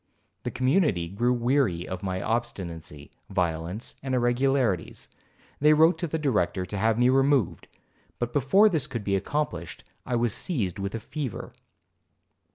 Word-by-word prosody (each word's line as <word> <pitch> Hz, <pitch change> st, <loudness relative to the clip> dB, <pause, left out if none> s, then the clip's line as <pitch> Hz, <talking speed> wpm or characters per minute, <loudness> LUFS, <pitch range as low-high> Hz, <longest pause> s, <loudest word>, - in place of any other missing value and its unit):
The -, -, -3 dB
community 130 Hz, -, +1 dB
grew 120 Hz, +6 st, +1 dB
weary 120 Hz, -8 st, +1 dB
of 95 Hz, -1 st, -5 dB
my 95 Hz, -1 st, -3 dB
obstinacy, 85 Hz, -10 st, -4 dB, 0.2 s
violence, 85 Hz, +5 st, -2 dB
and 130 Hz, -1 st, -2 dB
irregularities. 120 Hz, -5 st, +1 dB, 0.5 s
They 150 Hz, +2 st, +6 dB
wrote 160 Hz, +3 st, +4 dB
to 175 Hz, -, -1 dB
the 160 Hz, -, -2 dB
Director 105 Hz, -, 0 dB
to 100 Hz, +3 st, -5 dB
have 110 Hz, +2 st, +2 dB
me 125 Hz, +1 st, +4 dB
removed, 135 Hz, -4 st, +2 dB, 0.5 s
but 120 Hz, 0 st, -3 dB
before 150 Hz, -, +5 dB
this 160 Hz, -10 st, 0 dB
could 115 Hz, -5 st, -5 dB
be 100 Hz, -1 st, 0 dB
accomplished 95 Hz, -, -3 dB, 0.2 s
I 125 Hz, -, -2 dB
was 120 Hz, -2 st, +1 dB
seized 105 Hz, -, -2 dB
with 100 Hz, +2 st, -3 dB
a -, -, -3 dB
fever. 135 Hz, -1 st, -6 dB
120 Hz, 150 wpm, -26 LUFS, 95-135 Hz, 0.5 s, They